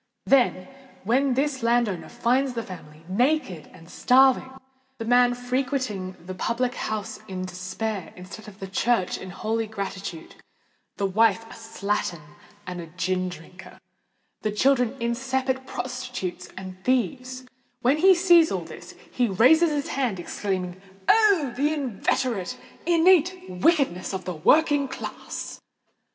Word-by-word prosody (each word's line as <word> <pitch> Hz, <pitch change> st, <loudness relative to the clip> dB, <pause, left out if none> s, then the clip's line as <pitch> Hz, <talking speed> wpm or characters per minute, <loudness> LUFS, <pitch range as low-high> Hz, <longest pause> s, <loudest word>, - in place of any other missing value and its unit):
Then 245 Hz, -8 st, +3 dB, 0.4 s
when 255 Hz, +5 st, +2 dB
this 275 Hz, -1 st, 0 dB
landowner 230 Hz, -5 st, +1 dB
finds 250 Hz, +2 st, +1 dB
the 230 Hz, -1 st, -3 dB
family 160 Hz, -6 st, -11 dB
naked 200 Hz, -, 0 dB
and 165 Hz, -, -15 dB
starving—the 265 Hz, +1 st, +1 dB
man 245 Hz, +1 st, +4 dB
frequenting 245 Hz, -6 st, -2 dB
the 185 Hz, -, -5 dB
public 245 Hz, +6 st, -1 dB
house 215 Hz, -4 st, -4 dB
in 185 Hz, -2 st, -4 dB
despair, 185 Hz, +1 st, -4 dB
instead 185 Hz, +4 st, -10 dB
of 200 Hz, -2 st, -12 dB
the 195 Hz, -, -6 dB
church 195 Hz, 0 st, 0 dB
in 185 Hz, -, -8 dB
holy 220 Hz, +4 st, -2 dB
gratitude—the 195 Hz, -1 st, -7 dB
wife 220 Hz, +2 st, +3 dB
a 225 Hz, -, -13 dB
slattern 200 Hz, -8 st, -3 dB, 0.3 s
and 180 Hz, -1 st, -5 dB
a 165 Hz, -, -9 dB
gin 185 Hz, +2 st, -1 dB
drinker—the 180 Hz, +4 st, -10 dB
children 250 Hz, +1 st, +2 dB
incipient 260 Hz, +2 st, -1 dB
prostitutes 250 Hz, -8 st, -5 dB
and 185 Hz, 0 st, -9 dB
thieves,—when 255 Hz, -, -1 dB
he 375 Hz, +4 st, +6 dB
sees 345 Hz, -2 st, +5 dB
all -, -, -2 dB
this, -, -, -11 dB, 0.2 s
he 245 Hz, -1 st, +1 dB
raises 255 Hz, -, +5 dB
his 290 Hz, -2 st, -2 dB
hands, 245 Hz, -9 st, -1 dB
exclaiming, 185 Hz, 0 st, -3 dB, 0.3 s
"Oh! 400 Hz, -, +4 dB
the 290 Hz, +4 st, +1 dB
inveterate, 250 Hz, -4 st, -1 dB, 0.3 s
innate 355 Hz, +1 st, +4 dB
wickedness 190 Hz, -, +1 dB
of 185 Hz, -, -6 dB
the 180 Hz, -, -3 dB
working 290 Hz, -, +3 dB
classes!" -, -, -7 dB
235 Hz, 125 wpm, -25 LUFS, 190-265 Hz, 0.4 s, he